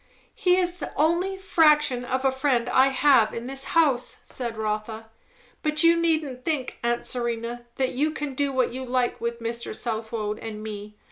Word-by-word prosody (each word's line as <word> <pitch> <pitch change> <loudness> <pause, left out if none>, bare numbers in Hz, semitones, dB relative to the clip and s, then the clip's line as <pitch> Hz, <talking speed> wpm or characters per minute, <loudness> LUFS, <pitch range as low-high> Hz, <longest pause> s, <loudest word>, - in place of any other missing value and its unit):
"He 360 0 +2
is 360 -1 +1
the 325 - -6
only 345 +5 +1
fraction 300 -8 +3
of 260 +2 -2
a 265 - +4
friend 265 -3 +1
I 260 +1 +5
have 265 -4 +4
in 230 - -5
this 270 +1 -3
house," 275 -7 +2
said 235 -3 -5
Rotha. 220 +1 -4 0.5
"But 305 0 +1
you 335 0 +6
needn't 310 -6 0
think, 295 -6 -2
aunt 235 0 0
Serena, 235 0 -3
that 260 -1 0
you 295 +5 +1
can 295 -2 -4
do 280 +1 0
what 255 -3 0
you 260 +1 -5
like 250 -1 -1
with 235 0 -3
Mr. 230 -1 -4
Southwode 220 -2 -3
and 215 -1 -7
me. 210 -1 -7
255 Hz, 180 wpm, -25 LUFS, 235-300 Hz, 0.5 s, you